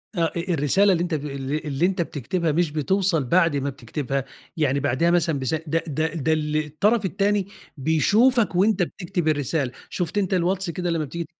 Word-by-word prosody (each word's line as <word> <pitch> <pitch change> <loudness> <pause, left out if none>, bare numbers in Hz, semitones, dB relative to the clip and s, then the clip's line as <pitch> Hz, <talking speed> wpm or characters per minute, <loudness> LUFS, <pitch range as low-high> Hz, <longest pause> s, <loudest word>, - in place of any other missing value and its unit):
آه. 170 -2 +2
آآ - - -2
الرسالة 175 +3 +2
اللي 175 -2 +2
أنت 175 -1 -3
ب 150 -1 -4
اللي 140 0 -3
اللي 150 +1 -1
أنت 190 -1 0
بتكتبها 165 +2 -2
مش 165 0 +1
بتوصل 170 +2 +1
بعد 165 +3 +3
ما 140 0 -1
بتكتبها، 140 -1 -4 0.3
يعني 140 -3 +1
بعديها 145 +5 +1
مثلًا 165 -4 +1
بسا 135 +5 -1
ده 165 +2 0
ده 155 +1 0
ده 160 -1 0
ال 150 -1 -1
الطَرَف 205 +9 +1
التاني 200 +1 0 0.3
بيشوفك 205 - +3
وأنت 195 +1 +3
بتكتب 175 -1 -3
الرسالة. 145 -2 0 0.2
شُفت 175 +1 -3
أنت 195 -2 +1
الواتس 185 +1 0
كده 175 +1 -3
لمّا 165 -2 0
بتيجي 170 +3 -5
165 Hz, 185 wpm, -23 LUFS, 145-185 Hz, 0.3 s, بعد